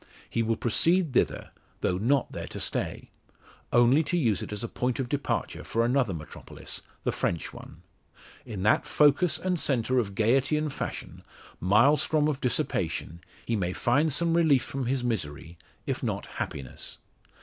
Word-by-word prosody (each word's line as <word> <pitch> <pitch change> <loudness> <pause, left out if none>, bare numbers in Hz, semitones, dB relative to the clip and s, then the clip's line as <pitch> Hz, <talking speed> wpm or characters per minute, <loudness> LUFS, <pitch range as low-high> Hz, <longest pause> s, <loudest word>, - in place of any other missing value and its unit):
He 115 - -1
will 115 0 +1
proceed 165 +8 +2
thither, - - 0 0.3
though 90 0 0
not 135 +7 +2
there - - -6
to - - -7
stay. - - -3 0.6
Only 120 +5 +5
to 175 - 0
use 115 - +1
it - - -6
as 105 +1 -3
a - - -2
point 125 +2 -2
of 130 - -1
departure 145 +2 -2
for 115 +1 0
another 125 -3 +2
metropolis 75 -4 -6 0.2
the - - +1
French 85 - -2
one. - - -12 0.6
In 100 -5 -6
that 105 - +3
focus 150 +4 +4
and 180 -2 -1
centre 130 -2 +1
of 100 -5 -2
gaiety 130 +8 +3
and 150 -2 -2
fashion - - -5 0.4
Maelstrom 145 - +4
of 145 -3 -2
dissipation 85 -8 -1 0.2
he 115 - 0
may 90 -3 -1
find 145 +10 +2
some 170 +4 +1
relief 155 -7 +4
from 130 -1 -4
his 130 0 0
misery, 80 -8 -3 0.3
if - - -2
not - - -2
happiness. 65 -3 -6
125 Hz, 160 wpm, -28 LUFS, 105-145 Hz, 0.6 s, Only